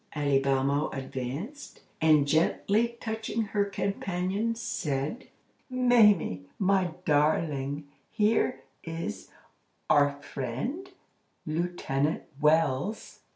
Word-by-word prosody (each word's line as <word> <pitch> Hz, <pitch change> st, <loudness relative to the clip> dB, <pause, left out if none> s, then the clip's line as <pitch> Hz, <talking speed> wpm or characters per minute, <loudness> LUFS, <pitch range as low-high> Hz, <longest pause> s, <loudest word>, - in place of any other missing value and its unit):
Alibamo 140 Hz, 0 st, +2 dB
advanced, 135 Hz, -, -6 dB, 0.2 s
and 155 Hz, -3 st, +5 dB
gently 205 Hz, +9 st, +2 dB
touching 220 Hz, 0 st, -2 dB
her 205 Hz, -1 st, 0 dB
companion, 195 Hz, +2 st, -2 dB
said: 155 Hz, -, -3 dB, 0.4 s
"Mamie, 220 Hz, -, +4 dB
my 190 Hz, -3 st, +1 dB
darling, 145 Hz, -1 st, +1 dB, 0.2 s
here 210 Hz, -, +1 dB, 0.2 s
is 165 Hz, -, -5 dB, 0.6 s
our 145 Hz, -1 st, +4 dB
friend, 145 Hz, -, -4 dB, 0.6 s
Lieutenant 155 Hz, -3 st, -1 dB, 0.2 s
Wells." 155 Hz, +4 st, +1 dB
160 Hz, 75 wpm, -28 LUFS, 140-210 Hz, 0.6 s, and